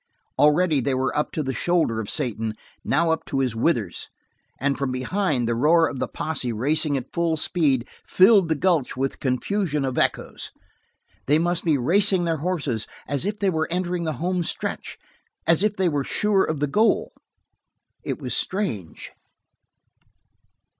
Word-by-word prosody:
Already 150 0 +4
they 130 +2 0
were 130 +1 -1
up 150 - 0
to 155 - -1
the 135 -1 -2
shoulder 165 -8 +1
of 105 - -5
Satan, 115 -5 -2 0.3
now 170 -1 +2
up 160 - -1
to 140 - -3
his 130 -4 0
withers, 115 - -1 0.5
and 140 +2 +1
from 135 -1 -2
behind 130 - -1
the 120 - +1
roar 160 +7 +4
of 130 - -6
the - - -1
posse 145 -6 -3
racing 145 +5 +1
at 130 0 -7
full 170 -2 0
speed, 145 -7 +1 0.2
filled 190 -2 +5
the 160 - +2
gulch 160 -5 +1
with 135 +1 -2
confusion 150 +3 -1
of 130 -1 -1
echoes. - - -1 0.8
They 145 +2 +4
must 175 +1 0
be 155 -4 +2
racing 190 +7 +3
their 165 -2 0
horses 145 - -2 0.2
as 145 +6 -1
if 210 0 -2
they 200 -2 +1
were 160 -1 -1
entering 180 0 -2
the 155 - -1
homestretch, 180 0 -3 0.5
as 165 +1 +4
if 210 0 +1
they 190 -2 +1
were 145 -4 0
sure 205 +5 +1
of 155 -2 -3
the - - +3
goal. 210 +11 +2 0.9
It - - -3
was - - -4
strange. 115 - -3
155 Hz, 165 wpm, -23 LUFS, 130-175 Hz, 0.9 s, filled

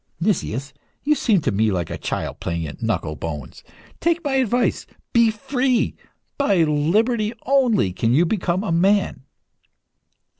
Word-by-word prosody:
"Nicias, 140 - -1 0.3
you 300 - +3
seem 220 - +2
to - - 0
me 105 +2 +2
like 90 -4 -2
a - - -3
child - - -4
playing 85 -1 -3
at 75 - -9
knuckle 105 -9 -1
bones. 75 -5 -7 0.4
Take 340 0 +1
my 285 -3 -1
advice 245 -1 +1 0.3
be 235 -1 +5
free! 250 +3 0 0.4
By 200 -11 +3
liberty 210 +10 +1
only 245 - +2
can 115 +5 0
you 155 +8 +4
become 185 0 -1
a 210 - -2
man." 185 -5 +2
190 Hz, 145 wpm, -22 LUFS, -, 0.4 s, be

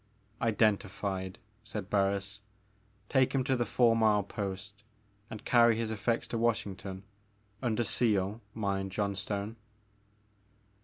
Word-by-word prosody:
'* 105 +2 -32
Identified," 100 -3 0 0.3
said 105 -3 -6
Barns, 100 0 0 0.7
take 130 +3 +3
him 130 - +2
to 135 0 +1
the 120 -1 0
four 120 -2 +4
mile 110 -2 +4
post 100 +1 -5 0.5
and 110 -2 -8
carry 120 -2 +6
his 115 0 -2
effects 110 +2 0
to 115 - -2
Washington, 100 -4 -1 0.3
— 100 0 -37
under 120 -2 +1
seal, 105 -2 +1
mind, 100 -3 -1
Johnstone." 100 +2 -2
105 Hz, 120 wpm, -31 LUFS, 100-115 Hz, 0.7 s, carry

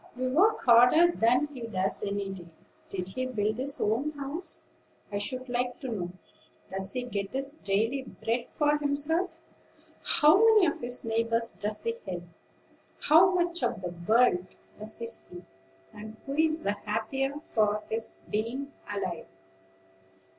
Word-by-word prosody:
"We 255 +1 -2
work 385 +11 +3
harder 250 +8 +6
than 250 0 +3
he 255 - -8
does 190 -3 0
any 200 -1 -2
day. 180 -3 -9 0.4
Did 185 -1 -4
he 255 +6 -3
build 215 -2 -1
his 275 +1 -1
own 250 +9 0
house, 290 +5 -4 0.5
I 200 - -1
should 255 +5 -4
like 245 0 -2
to 265 - -4
know? 180 -6 -3 0.6
Does 190 0 -3
he 250 - -2
get 200 -5 -4
his 270 +2 -1
daily 225 +1 0
bread 235 -2 -3
for 295 0 +1
himself? 320 +5 0 0.6
How 305 +3 +5
many 440 -3 +6
of 315 - -1
his 245 0 0
neighbors 230 +1 +1
does 210 +1 -3
he 230 - 0
help? 175 -2 -4 0.8
How 330 +5 +6
much 345 -1 0
of - - -1
the 175 -1 -4
world 220 -5 +4 0.3
does 215 +1 -5
he 230 - -4
see, 180 -6 -4 0.5
and 215 +1 -9
who 275 - -4
is 315 +2 +1
the 200 - +1
happier 225 +7 -2
for 210 -7 0
his 225 0 -4
being 240 +7 -3 0.2
alive?" 185 - -3
240 Hz, 155 wpm, -29 LUFS, 210-285 Hz, 0.8 s, harder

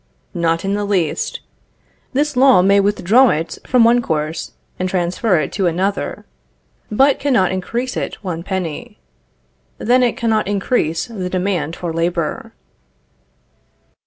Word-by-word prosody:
Not 165 -1 0
in 195 - 0
the 205 0 -1
least. 185 -7 -1 0.7
This 290 +1 0
law 255 -7 +6
may 200 +1 +4
withdraw 210 +5 +4
it 160 -2 -2
from 250 -2 +4
one 235 +1 +4
course, 155 -4 -3 0.3
and 185 0 -1
transfer 180 +2 +1
it 155 - -1
to 195 -3 0
another; 190 +4 -2 0.6
but 270 +6 +3
cannot 245 -10 +2
increase 235 +7 -3
it - - -3
one 170 -4 -4
penny. 180 -4 -5 0.8
Then 250 +3 +2
it 240 -2 +1
cannot 225 -4 0
increase 195 -5 0
the 195 -6 -5
demand 180 -4 -1
for 170 -2 -4
labor. 170 -1 -2
190 Hz, 130 wpm, -18 LUFS, 170-230 Hz, 0.8 s, law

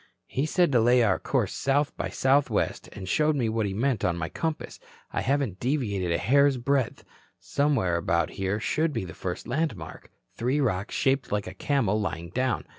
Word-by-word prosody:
"He 135 +4 -2
said 175 -1 +2
to 125 - +4
lay 120 +1 +5
our 100 -4 +2
course - - 0
south 140 +1 0
by - - -3
south 135 +2 +2
west - - -1
and 95 -2 -8
showed 150 - +2
me 120 -5 0
what 110 -1 0
he 95 - -3
meant 120 0 0
on 85 -2 +1
my 80 -1 -3
compass. 160 -2 -4 0.3
I - - 0
haven't 135 -8 0
deviated 110 - -1
a 85 - +2
hair's 140 +5 +3
breadth. 130 0 0 0.4
Somewhere 140 -12 +1
about 85 -1 0
here 95 +2 -2
should 155 +7 0
be 95 - -2
the 85 - -8
first 90 +4 -5
landmark 120 - -3 0.2
three 130 +5 0
rocks 105 -7 -1
shaped 135 0 +1
like 105 0 0
a 90 - -7
camel 110 -1 0
lying 85 -4 -4
down. 130 +4 -1
120 Hz, 190 wpm, -27 LUFS, 95-140 Hz, 0.4 s, lay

